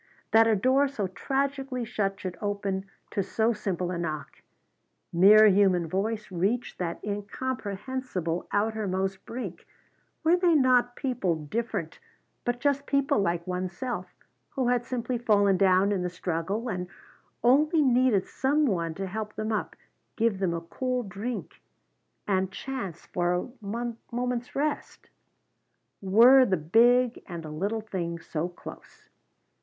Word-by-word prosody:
That 225 0 +6
a 225 - +4
door 260 +7 +3
so 265 -7 -3
tragically 270 +4 -2
shut 200 -4 -2
should 185 -2 -5
open 200 -2 -2 0.3
to 200 - 0
so 220 +4 +1
simple 185 -4 -2
a 175 - -3
knock! 155 -3 -5 0.7
Mere 205 +5 +8
human 190 -4 +4
voice 205 +5 -2
reach 200 +8 -1
that 170 -2 -3
incomprehensible 205 -3 -3
outermost 195 -3 -1
brink! 245 +2 -6 0.6
Were 325 +2 +5
they 355 -2 +3
not 250 -3 +3
people 190 - -1
different, 205 -2 -3 0.5
but 245 0 -1
just 280 0 0
people 275 -5 +2
like 170 -3 0
one's 180 0 -3
self, 240 -8 -3 0.4
who 260 -3 -1
had 245 -1 +1
simply 245 -1 -2
fallen 205 -4 +3
down 190 +1 +4
in 195 -3 0
the 180 - -1
struggle, 180 +6 -3
and 180 -5 -3 0.6
only 300 +6 +4
needed 250 -6 +3
some 290 +3 +1
one 170 - -1
to 195 - -4
help 210 +2 -5
them 215 +1 -3
up, 215 - -2 0.4
give 225 -4 +1
them 180 -3 0
a 165 - -3
cool 250 +8 -2
drink 215 +4 -6 0.7
and 190 -1 +1
chance 200 - -6
for 175 0 0
a 180 - -3 0.6
moment's 245 0 -3
rest? 295 +2 -3 0.9
Were 235 +7 +7
the 195 -7 +1
big 235 +9 +3
and 170 -2 -6
the 155 - -7
little 200 +8 -2
things 170 -5 -5
so 165 +2 -2
close? 175 - -12
210 Hz, 140 wpm, -27 LUFS, 185-250 Hz, 0.9 s, Mere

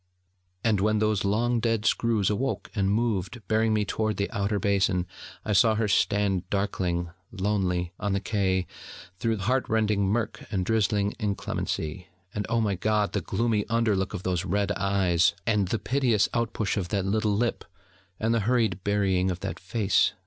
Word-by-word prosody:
And 110 -4 +2
when 110 +2 +2
those 110 -1 +1
long 115 +4 +1
dead 115 -1 0
screws 110 -5 +2
awoke 130 +6 -2
and 100 -3 +1
moved, 110 0 0
bearing 110 +1 +2
me 105 -1 +1
toward 110 -1 -1
the 100 - -1
Outer 100 0 0
Basin, 95 -3 +1 0.4
I 105 - 0
saw 110 +3 +5
her 110 0 0
stand 95 -2 +1
darkling, 90 -4 -1 0.2
lonely, 95 -4 -1
on 100 -1 -1
the 100 - +1
Quai 95 -3 0 0.5
through 115 -1 0
heart 125 +7 0
rending 105 -3 +2
murk 110 +2 -1
and 95 -4 -1
drizzly 105 -1 +1
inclemency: 95 -5 -3 0.3
and 105 - -3
oh 115 0 +2
my 105 -2 +1
God, 105 +2 0
the - - 0
gloomy 115 -3 0
under 115 -2 +2
look 95 +2 -2
of 95 - -6
those 90 -1 0
red 100 +2 0
eyes, 95 -4 +2
and 105 -4 +2
the 115 - 0
piteous 125 -4 +2
out 115 -1 0
push 105 -2 -1
of 95 -3 -1
that 100 -3 -1
little 105 +1 +1
lip, 120 +1 -1 0.6
and 115 +1 +1
the 115 - +2
hurried 110 -7 +1
burying 95 -2 +1
of 90 -1 -4
that - - -4
face! 100 +1 +1
105 Hz, 175 wpm, -27 LUFS, 95-110 Hz, 0.6 s, saw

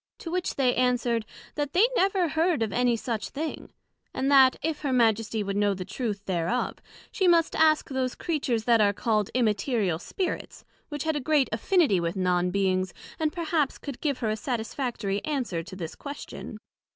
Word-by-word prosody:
To 330 - -7
which 360 0 -1
they 255 -3 +2
answered, 245 -3 +1 0.3
That 290 0 -3
they 390 +6 +5
never 380 -4 +2
heard 320 -3 +1
of 210 -3 -3
any 245 -1 +2
such 225 -1 -3
thing; 310 +2 -5 0.4
and 270 +2 0
that, 265 -2 +7
if 315 -1 -2
her 285 -3 -1
Majesty 225 -3 +2
would 200 0 -3
know 205 -1 +2
the 185 -1 -6
truth 205 0 -4
thereof, 180 +6 -1 0.3
she 380 - +1
must 335 -2 +4
ask 310 -1 +4
those 260 -2 -2
Creatures 270 -9 -1
that 230 -1 +4
are 205 -1 +4
called 215 -1 0
Immaterial 215 - +1
spirits, 370 - -4 0.2
which 295 -2 -4
had 315 -1 0
a - - 0
great 290 0 +2
affinity 235 - +2
with 170 +1 -2
Non 180 -1 +1
beings, 185 -1 0 0.2
and 310 -1 +1
perhaps 320 -4 -1
could 280 -4 -8
give 285 -4 0
her 220 -2 0
a - - 0
satisfactory 225 -3 -3
answer 255 - -2
to 185 +3 -10
this 165 -4 -6
question. 285 0 -8
245 Hz, 180 wpm, -27 LUFS, 205-300 Hz, 0.4 s, that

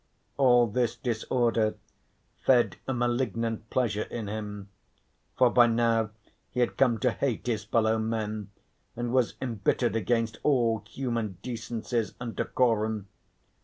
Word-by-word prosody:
All 125 -3 +5
this 115 +1 0
disorder 115 -2 0 0.7
fed 125 -2 +4
a - - 0
malignant 120 -2 -1
pleasure 110 -5 0
in 115 -3 -4
him. 105 -1 -5 0.7
For 125 -2 +5
by 120 -1 +6
now 115 -1 +2 0.4
he 125 - -4
had 120 - +1
come 125 -4 +3
to 125 - +3
hate 130 -1 -2
his 110 -4 -1
fellow 110 0 +2
men 110 -2 -2 0.5
and 120 0 -3
was 130 -3 +2
embittered 120 0 0
against 115 +1 0
all 115 -6 +2
human 115 -7 -3
decencies 115 -1 -3
and 120 -2 -5
decorum. 110 -4 0
115 Hz, 130 wpm, -28 LUFS, 110-120 Hz, 0.7 s, by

